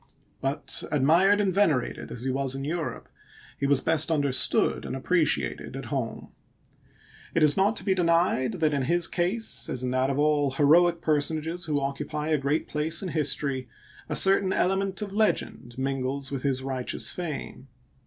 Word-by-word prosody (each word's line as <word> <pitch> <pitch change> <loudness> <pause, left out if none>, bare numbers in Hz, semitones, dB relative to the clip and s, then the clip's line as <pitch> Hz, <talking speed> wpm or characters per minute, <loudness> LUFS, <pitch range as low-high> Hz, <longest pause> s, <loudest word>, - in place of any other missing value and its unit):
But 135 +2 +1
admired 165 +8 +4
and 195 -3 +1
venerated 165 -10 0
as 120 - -6
he 130 - -1
was 135 0 -1
in 135 - -5
Europe, 160 +1 -4 0.5
he 140 - 0
was 140 -1 +3
best 160 -1 +2
understood 145 -5 +1
and - - -5
appreciated 135 - 0
at - - -6
home* - - -4 1.1
It 165 - +3
is 150 -1 +5
not 200 +3 +2
to - - -4
be 195 - +2
denied 170 -8 +1
that 155 -2 0
in 140 -2 0
his 175 +4 +2
case, 185 +6 0
as 130 - -3
in 125 - -1
that 130 +1 +1
of 135 - -1
all 145 -1 +2
heroic 165 +5 +4
personages 160 +3 0
who 150 -2 0
occupy 150 +2 -3
a 155 -2 +2
great 140 +3 -1
place 155 +4 -1
in 185 - -3
history, 140 -4 -1 0.4
a 150 - -1
certain 195 +1 +3
element 195 +2 0
of 200 -1 -7
legend 165 - -1
mingles 135 +1 -2
with 135 -2 -3
his 130 -1 -1
righteous 130 -2 -2
fame. 155 -6 -6
150 Hz, 170 wpm, -26 LUFS, 135-175 Hz, 1.1 s, is